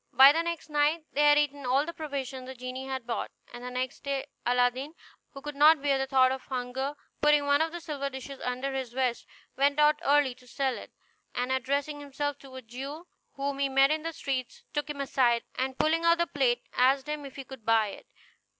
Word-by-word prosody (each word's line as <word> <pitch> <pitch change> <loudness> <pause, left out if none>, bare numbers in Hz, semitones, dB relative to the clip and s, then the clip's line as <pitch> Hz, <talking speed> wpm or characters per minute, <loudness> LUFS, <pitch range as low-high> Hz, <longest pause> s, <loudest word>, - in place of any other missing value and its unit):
By 265 +3 +9
the 325 +3 +1
next 335 -1 -4
night 300 +2 +2
they 290 - +2
had 295 - +6
eaten 285 -1 0
all 260 +3 +2
the 335 - -5
provisions 275 -4 -5
the 260 - -7
genie 255 +1 -6
had 260 -3 -4
brought; 235 - -3 0.2
and 240 0 -8
the 250 - -4
next 255 0 -3
day 275 -1 -2 0.2
Aladdin, 250 +5 +1 0.3
who 275 -1 -11
could 295 0 -5
not 305 +2 +7
bear 280 -2 +2
the 270 - -1
thought 260 -1 +4
of 265 0 -3
hunger, 260 +2 -3 0.3
putting 295 -1 +4
one 285 +1 +3
of 320 0 +1
the 345 - -5
silver 290 -4 -4
dishes 265 +1 -8
under 255 +2 -2
his 260 -3 -4
vest, 255 -2 -1 0.3
went 280 +1 +3
out 300 0 +5
early 285 -3 +3
to 250 0 -20
sell 265 0 -1
it, - - -10 0.4
and 250 +1 -1
addressing 280 +3 -1
himself 290 0 -3
to 265 -1 -13
a 260 - -8
Jew 270 +8 -7 0.3
whom 275 0 -3
he 280 -1 +1
met 270 +1 +5
in 310 0 0
the 330 +1 -3
streets, 270 -6 -4
took 295 0 -2
him 295 -1 -5
aside, 245 -4 +2
and 260 0 -2
pulling 325 +2 +2
out 335 0 +5
the 340 - +2
plate, 265 -6 +1
asked 265 +2 +3
him 300 -1 -3
if 275 -2 -9
he 275 - -7
would 265 -4 -10
buy 225 -1 +3
it. - - -11
275 Hz, 225 wpm, -29 LUFS, 255-295 Hz, 0.4 s, By